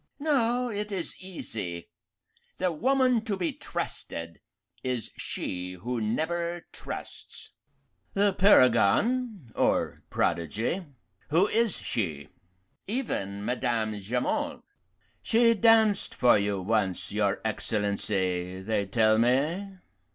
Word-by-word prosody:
"No, 250 Hz, -4 st, +1 dB
it 210 Hz, 0 st, -3 dB
is 185 Hz, -4 st, -1 dB
easy. 110 Hz, -, -4 dB, 0.7 s
The 185 Hz, -1 st, +1 dB
woman 255 Hz, -, +2 dB
to 205 Hz, -4 st, -1 dB
be 175 Hz, -3 st, -1 dB
trusted 85 Hz, 0 st, -5 dB, 0.4 s
is 125 Hz, -4 st, -2 dB
she 90 Hz, 0 st, -4 dB
who 115 Hz, +6 st, -4 dB
never 170 Hz, +9 st, -1 dB
trusts." -, -, -7 dB, 0.6 s
"The 200 Hz, 0 st, +3 dB
paragon 185 Hz, -, +4 dB
or -, -, +1 dB
prodigy 110 Hz, -, 0 dB, 0.5 s
who 170 Hz, +7 st, +4 dB
is 225 Hz, -3 st, +2 dB
she?" 80 Hz, -10 st, -3 dB, 0.6 s
"Even 100 Hz, -, -3 dB
Madame 115 Hz, -4 st, -1 dB
Jamond." 120 Hz, +6 st, -2 dB, 0.6 s
"She 230 Hz, +1 st, +4 dB
danced 220 Hz, -2 st, +4 dB
for 125 Hz, -, +5 dB
you 100 Hz, -2 st, 0 dB
once, 100 Hz, -3 st, 0 dB
your 100 Hz, -1 st, +1 dB
Excellency, 100 Hz, -4 st, -1 dB
they 100 Hz, -1 st, 0 dB
tell 110 Hz, +2 st, +3 dB
me." 155 Hz, -, +1 dB
125 Hz, 100 wpm, -28 LUFS, -, 0.7 s, for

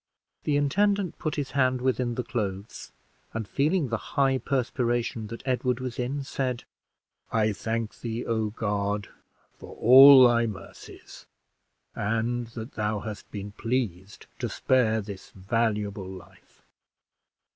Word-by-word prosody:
The 145 Hz, -1 st, +2 dB
intendant 200 Hz, +6 st, +1 dB
put 155 Hz, -, -2 dB
his 140 Hz, -4 st, -3 dB
hand 130 Hz, -1 st, +2 dB
within 125 Hz, -1 st, 0 dB
the 125 Hz, -, -2 dB
clothes, 105 Hz, -5 st, -5 dB, 0.4 s
and 110 Hz, -2 st, -3 dB
feeling 150 Hz, -, +1 dB
the 115 Hz, -, 0 dB, 0.2 s
high 135 Hz, -1 st, +3 dB
perspiration 120 Hz, -4 st, -1 dB
that 115 Hz, +2 st, -8 dB
Edward 125 Hz, -1 st, 0 dB
was 130 Hz, -1 st, -5 dB
in, 135 Hz, +3 st, -2 dB
said 130 Hz, -2 st, -3 dB, 0.7 s
"I 110 Hz, -1 st, +2 dB
thank 115 Hz, +2 st, -3 dB
thee, 115 Hz, 0 st, -4 dB
O 110 Hz, -2 st, 0 dB
God! 105 Hz, -2 st, -2 dB, 0.4 s
for -, -, -12 dB
all 130 Hz, +2 st, +9 dB
thy 120 Hz, -1 st, +2 dB
mercies, 95 Hz, -3 st, -11 dB, 0.7 s
and 115 Hz, +3 st, -1 dB
that 115 Hz, +1 st, -8 dB
thou 105 Hz, -1 st, -2 dB
hast 105 Hz, -2 st, -7 dB
been 100 Hz, -1 st, -6 dB
pleased 105 Hz, -5 st, -3 dB
to -, -, -2 dB
spare 110 Hz, -4 st, +2 dB
this 100 Hz, -2 st, -9 dB
valuable 105 Hz, -1 st, -1 dB
life. 90 Hz, -2 st, -14 dB
115 Hz, 130 wpm, -27 LUFS, 105-130 Hz, 0.7 s, all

